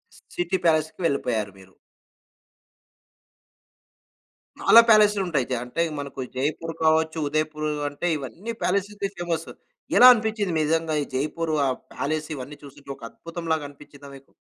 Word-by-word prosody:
స్ - - -17 0.2
సిటీ 175 +2 0
ప్యాలెస్‌కి 160 +1 +1
వెళ్ళిపోయారు 115 -9 -1
మీరు. 95 0 -18 2.9
చాలా 230 - +8
ప్యాలెసులుంటయి. 200 - +4
జా 125 - +1
అంటే, 145 +7 -3 0.2
మనకు 140 -1 -6
జైపూర్ 155 +5 -2
కావచ్చు, 160 0 +2
ఉదయపూరూ 155 +1 -1 0.2
అంటే, 145 +5 -4
ఇవన్నీ 175 - -7
ప్యాలెసితే 200 +1 -1
ఫేమస్. 170 -2 -3 0.5
ఎలా 250 - +10
అనిపిచ్చింది 215 -5 -2
నిజంగా 160 +1 0
ఈ - - -7
జైపూరు, 155 +4 -2
ఆ - - +1 0.2
ప్యాలెస్, 155 +2 -3
ఇవన్నీ 140 +3 -8
చూస్తుంటే 140 0 -11
ఒక 135 - -18
అద్భుతంలాగనిపిచ్చిందా 150 -4 -6
మీకు? 135 0 -17
155 Hz, 120 wpm, -24 LUFS, 140-175 Hz, 2.9 s, ఎలా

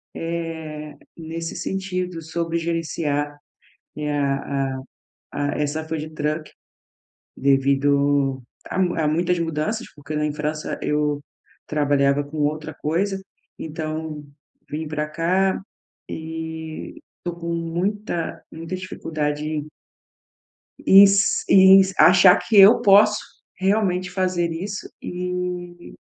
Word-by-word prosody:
eh, 160 -3 -5 0.2
nesse 165 +1 -5
sentido, 185 -3 -3
sobre 165 +1 -2
gerenciar, 155 -3 -2 0.6
eh, 150 -1 -2
a 135 -1 -1
a - - -6 0.5
a 145 0 -1
essa 150 +2 -1
food 155 -1 -4
truck, 155 +1 -2 0.9
devido 140 0 +2 0.3
a 190 - -2
muita 175 -3 +1
a - - +2
muitas 175 +3 +1
mudanças, 165 +8 -2
porque 145 +1 -8
em 150 0 0
França 150 0 -3
eu 150 -1 0 0.5
trabalhava 145 -1 +2
com 150 +2 -9
outra 150 +1 -1
coisa, 195 +5 -1 0.4
então 155 -1 -5 0.5
vim 155 +1 -4
pra 150 0 -2
cá, 185 +4 +1 0.5
e 160 0 -6 0.2
tô 175 -1 -3
com 170 0 -4
muita 170 +2 -2
muita 165 +3 -6
dificuldade 155 -5 -3
em 155 -1 -3 1.2
Is 200 +1 +6
is 190 0 +7
e - - -14
achar 180 +1 +8
que 220 - 0
eu 195 +3 +8
posso, 210 +1 +6 0.4
realmente, 190 -2 +1
fazer 180 -2 0
isso 195 +5 -5
e 180 -1 -5
160 Hz, 110 wpm, -22 LUFS, 150-180 Hz, 1.2 s, achar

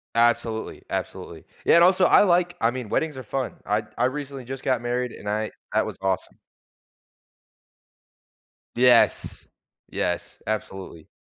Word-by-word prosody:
Absolutely, 115 -1 +1
absolutely. - - -5 0.2
Yeah, - - +6
and 170 - +7
also, 185 +1 +5
I, - - +6
like, 175 -1 +2
I 115 - +3
mean, 125 -3 -6
weddings 160 +4 0
are 130 - -6
fun. 130 +3 -3
I 105 +1 0
I 125 - +2
recently 140 0 -4
just 130 +1 -7
got 130 -3 +1
married 125 0 -2
and 105 - -7
I 110 +1 -1 0.2
that - - +2
was - - -6
awesome. 95 -1 -2 2.4
Yes, 125 -1 +3 0.4
yes, 90 0 -3
absolutely. 95 -6 -5
120 Hz, 140 wpm, -24 LUFS, 110-135 Hz, 2.4 s, and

